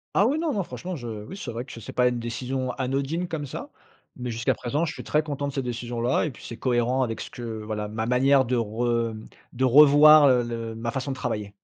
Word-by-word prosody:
Ah 205 Hz, -, +5 dB
oui, 290 Hz, +4 st, +1 dB
non 325 Hz, -2 st, 0 dB
non. 200 Hz, -6 st, -1 dB
Franchement, 180 Hz, +1 st, -6 dB
je 120 Hz, -3 st, -7 dB
oui, 110 Hz, -, -7 dB
c'est 125 Hz, -10 st, -6 dB
vrai 115 Hz, +2 st, -4 dB
que 120 Hz, -3 st, -10 dB
c'est -, -, -9 dB
pas 125 Hz, 0 st, +3 dB
une 120 Hz, -1 st, -3 dB
décision 125 Hz, +2 st, -3 dB
anodine 135 Hz, +7 st, -2 dB
comme 150 Hz, -3 st, -3 dB
ça, -, -, -7 dB, 0.5 s
mais 125 Hz, 0 st, -4 dB
jusqu'à 115 Hz, 0 st, 0 dB
présent, 145 Hz, +7 st, -2 dB
je 165 Hz, -, -1 dB
suis -, -, -9 dB
très 150 Hz, 0 st, +1 dB
content 145 Hz, -2 st, -3 dB
de 140 Hz, -, -5 dB
cette 135 Hz, -, -2 dB
décision-là, 120 Hz, 0 st, -1 dB
et 155 Hz, -, -3 dB
puis, -, -, -15 dB
c'est 115 Hz, -, -7 dB
cohérent 125 Hz, +1 st, +1 dB
avec 115 Hz, -3 st, -3 dB
ce -, -, -7 dB
que 115 Hz, -3 st, -6 dB
voilà, 105 Hz, -1 st, -3 dB
ma 110 Hz, +1 st, -3 dB
manière 130 Hz, +2 st, +4 dB
de 125 Hz, 0 st, 0 dB
rem 115 Hz, 0 st, -1 dB, 0.3 s
de 130 Hz, +2 st, -2 dB
revoir, 150 Hz, +3 st, +8 dB
heu, 125 Hz, -2 st, +4 dB
le 115 Hz, -1 st, -5 dB
ma 115 Hz, +1 st, -3 dB
façon 135 Hz, +2 st, -3 dB
de 135 Hz, -, -3 dB
travailler. 105 Hz, -5 st, -4 dB
125 Hz, 240 wpm, -25 LUFS, 115-140 Hz, 0.5 s, revoir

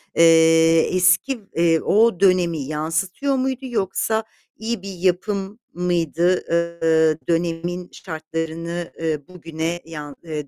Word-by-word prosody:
Eee, 165 Hz, 0 st, +5 dB, 0.2 s
eski, 185 Hz, +8 st, +3 dB, 0.2 s
eee, 165 Hz, -1 st, +3 dB
o 215 Hz, -3 st, +3 dB
dönemi 180 Hz, -4 st, +3 dB
yansıtıyor 165 Hz, -, -2 dB
muydu, 260 Hz, 0 st, -1 dB
yoksa 220 Hz, -1 st, -1 dB, 0.3 s
iyi 225 Hz, -2 st, -3 dB
bir 195 Hz, -1 st, -7 dB
yapım 190 Hz, +4 st, -1 dB
mıydı, 175 Hz, 0 st, +1 dB
eee, 165 Hz, -2 st, +2 dB
dönemin 170 Hz, +1 st, -2 dB
şartlarını, 165 Hz, +1 st, -5 dB
eee, 160 Hz, -2 st, -1 dB
bugüne 165 Hz, -1 st, -5 dB
yan 150 Hz, -3 st, -8 dB
eee, 150 Hz, -3 st, -5 dB
170 Hz, 110 wpm, -21 LUFS, 165-190 Hz, 0.3 s, Eee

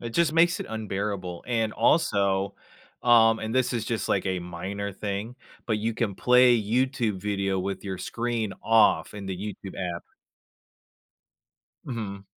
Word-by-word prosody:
It 115 Hz, -, -5 dB
just 165 Hz, +4 st, +2 dB
makes 165 Hz, +1 st, +3 dB
it -, -, -4 dB
unbearable, 100 Hz, -4 st, -4 dB
and, 115 Hz, -3 st, 0 dB
also, 100 Hz, -9 st, +2 dB, 0.5 s
um, 115 Hz, -2 st, +5 dB
and 110 Hz, +2 st, -4 dB
this 130 Hz, -1 st, +2 dB
is 115 Hz, -2 st, -2 dB
just, 110 Hz, -4 st, -2 dB
like, -, -, +1 dB
a 95 Hz, -1 st, 0 dB
minor 95 Hz, +4 st, -5 dB
thing, 105 Hz, +5 st, -4 dB, 0.3 s
but 110 Hz, -3 st, 0 dB
you 115 Hz, +2 st, -1 dB
can 110 Hz, -3 st, -1 dB
play 125 Hz, +1 st, +5 dB
YouTube 120 Hz, -2 st, 0 dB
video 100 Hz, -2 st, -1 dB
with 95 Hz, +1 st, -3 dB
your 95 Hz, -2 st, -4 dB
screen 115 Hz, -3 st, -2 dB
off 115 Hz, -2 st, +3 dB
in 100 Hz, -1 st, -7 dB
the 95 Hz, -1 st, -3 dB
YouTube 100 Hz, -1 st, -7 dB, 0.2 s
app. -, -, -10 dB, 1.8 s
Mhm. 100 Hz, -6 st, -5 dB
105 Hz, 150 wpm, -26 LUFS, 100-120 Hz, 1.8 s, um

